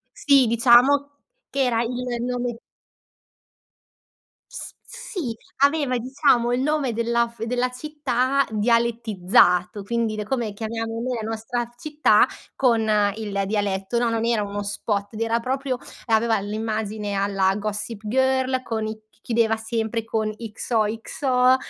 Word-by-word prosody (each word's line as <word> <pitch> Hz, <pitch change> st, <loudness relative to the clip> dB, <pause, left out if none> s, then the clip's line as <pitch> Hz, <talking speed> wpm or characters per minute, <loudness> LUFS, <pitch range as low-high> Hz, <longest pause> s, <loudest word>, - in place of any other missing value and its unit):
Sì, 280 Hz, -3 st, +4 dB
diciamo 245 Hz, +5 st, +5 dB, 0.4 s
che 275 Hz, 0 st, 0 dB
era 230 Hz, -2 st, +1 dB
il 245 Hz, 0 st, -3 dB
nome 245 Hz, -1 st, -2 dB, 1.9 s
S -, -, -8 dB, 0.2 s
sì 380 Hz, -, -5 dB, 0.3 s
aveva 280 Hz, -3 st, +3 dB
diciamo 250 Hz, -1 st, +2 dB
il 250 Hz, -, +1 dB
nome 285 Hz, -4 st, 0 dB
della 235 Hz, +1 st, +1 dB
f 230 Hz, -1 st, -9 dB
della 250 Hz, +1 st, 0 dB
città 275 Hz, -1 st, 0 dB
dialettizzato 215 Hz, -4 st, +2 dB
quindi 220 Hz, 0 st, -1 dB
come 230 Hz, -2 st, -2 dB
chiamiamo 225 Hz, +1 st, -4 dB
noi 250 Hz, +1 st, -2 dB
la 220 Hz, -, -4 dB
nostra 225 Hz, +2 st, -3 dB
città 300 Hz, +3 st, +3 dB, 0.3 s
con 240 Hz, -4 st, +3 dB, 0.3 s
il 205 Hz, -3 st, -2 dB
dialetto. 200 Hz, +1 st, -1 dB
No, 235 Hz, 0 st, +2 dB
non 230 Hz, 0 st, -1 dB
era 230 Hz, -3 st, +1 dB
uno 205 Hz, 0 st, -4 dB
spot 205 Hz, 0 st, -3 dB
ed 220 Hz, -, -6 dB
era 230 Hz, 0 st, +1 dB
proprio 260 Hz, +1 st, -2 dB, 0.3 s
aveva 225 Hz, -1 st, +2 dB
l'immagine 215 Hz, 0 st, -3 dB
alla 195 Hz, -1 st, +1 dB
Gossip 210 Hz, +1 st, -4 dB
Girl 260 Hz, +2 st, +1 dB
con 220 Hz, -3 st, -2 dB
i 215 Hz, -, -3 dB
c 215 Hz, 0 st, -28 dB
chiedeva 230 Hz, -1 st, +2 dB
sempre 225 Hz, 0 st, -2 dB
X-O-X-O, 225 Hz, +3 st, 0 dB
230 Hz, 125 wpm, -23 LUFS, 215-250 Hz, 1.9 s, diciamo